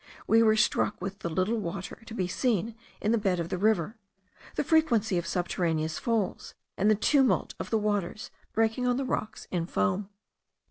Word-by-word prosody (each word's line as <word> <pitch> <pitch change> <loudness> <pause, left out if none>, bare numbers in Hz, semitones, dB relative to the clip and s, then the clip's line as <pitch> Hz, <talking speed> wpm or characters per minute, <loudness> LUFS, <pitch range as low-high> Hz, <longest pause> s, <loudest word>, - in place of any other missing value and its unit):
We 225 +1 +5
were 220 -1 +5
struck 215 -1 +1
with 195 +2 -5
the 170 - -3
little 185 +7 0
water 175 0 -5
to 225 - -7
be 185 -5 -1
seen 225 +1 0 0.3
in 210 - 0
the 230 - +3
bed 190 -4 +1
of 170 0 -3
the - - -2
river, 215 0 +1 0.6
the - - +1
frequency 235 - +3
of 170 - -5
subterraneous 165 -3 -1
falls, 225 -5 -2 0.2
and 205 +3 +2
the 215 - +5
tumult 265 +5 +2
of - - -5
the 225 - +2
waters 205 -1 -2 0.2
breaking 225 +3 +1
on 245 0 +2
the 270 - -1
rocks 220 -4 -3
in 170 -2 -1
foam. 180 - 0
210 Hz, 185 wpm, -28 LUFS, 180-225 Hz, 0.6 s, We